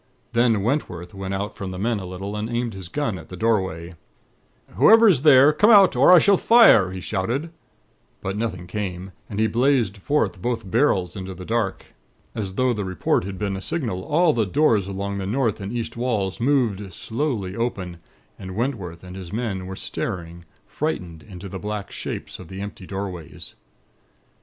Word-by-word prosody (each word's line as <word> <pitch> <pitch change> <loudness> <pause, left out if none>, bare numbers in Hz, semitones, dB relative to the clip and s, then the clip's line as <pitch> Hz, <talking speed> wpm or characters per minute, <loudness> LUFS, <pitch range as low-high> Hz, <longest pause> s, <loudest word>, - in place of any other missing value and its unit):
"Then 115 -4 +3
Wentworth 90 - -2
went 95 0 -4
out 100 +2 -4
from 95 - -5
the 95 - -6
men 110 +3 0
a 95 - -7
little, 95 +3 -6
and 105 +1 -3
aimed 120 -1 -2
his 95 -3 -8
gun 125 -9 -2
at 80 - -13
the 90 - -8
doorway. 95 -6 -1 0.8
"'Whoever 225 - +7
is 165 -11 +4
there, 145 0 +7
come 210 +8 +4
out, 200 - +7
or 130 +7 +6
I 180 - +10
shall 195 +4 +5
fire,' 225 - +6
he 95 0 -6
shouted; 120 - -2 0.7
but 95 +1 -4
nothing 100 -5 -3
came, 95 -1 -5 0.2
and 105 - -4
he 110 - +4
blazed 120 -3 +2
forth 125 -4 -1
both 115 -4 -3
barrels 100 -8 +2
into 95 -1 -6
the 90 +1 -9
dark. 110 -3 -2 0.4
As 95 -3 -4
though 130 +1 +2
the 105 -3 -3
report 95 -1 0
had 95 -1 -6
been 100 -1 -2
a 95 - -5
signal, 115 - -3
all 160 - +3
the 110 -5 0
doors 110 - +2
along 100 0 -4
the 95 - -4
north 115 -2 0
and 100 +1 -5
east 120 -1 -4
walls 110 -6 -1
moved 115 -7 +1
slowly 110 - -3
open, 95 -7 -3 0.4
and 95 -1 -7
Wentworth 100 -9 -3
and 90 0 -9
his 90 -3 -8
men 105 -5 -3
were 95 - -6
staring, 85 -2 -5 0.2
frightened 90 - -4
into 95 0 -10
the 95 0 -7
black 105 0 -5
shapes - - -6
of 90 - -10
the 95 +3 -8
empty 100 -2 -7
doorways. 95 -5 -7
100 Hz, 185 wpm, -23 LUFS, 95-120 Hz, 0.8 s, I